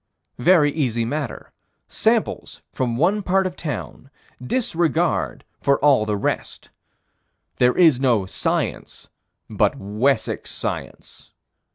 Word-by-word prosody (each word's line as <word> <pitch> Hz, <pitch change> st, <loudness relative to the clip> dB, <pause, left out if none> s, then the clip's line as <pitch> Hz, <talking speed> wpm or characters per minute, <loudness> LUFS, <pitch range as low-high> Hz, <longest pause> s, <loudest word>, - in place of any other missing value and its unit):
Very 150 Hz, +1 st, +4 dB
easy 120 Hz, -7 st, -1 dB
matter. 140 Hz, +1 st, -5 dB, 0.4 s
Samples -, -, -1 dB
from 120 Hz, -3 st, -1 dB
one 190 Hz, +9 st, +2 dB
part 190 Hz, 0 st, +1 dB
of 180 Hz, -1 st, -3 dB
town. 135 Hz, -3 st, -6 dB, 0.3 s
Disregard 170 Hz, -, 0 dB, 0.2 s
for 140 Hz, 0 st, +2 dB
all 135 Hz, -7 st, +3 dB
the 105 Hz, -1 st, 0 dB
rest. -, -, -4 dB, 0.9 s
There 125 Hz, 0 st, +3 dB
is 160 Hz, -8 st, +5 dB
no 120 Hz, -7 st, +2 dB
science 95 Hz, -, -3 dB, 0.4 s
but -, -, +1 dB
Wessex 110 Hz, +5 st, -1 dB
science. -, -, -6 dB
140 Hz, 105 wpm, -22 LUFS, 120-170 Hz, 0.9 s, is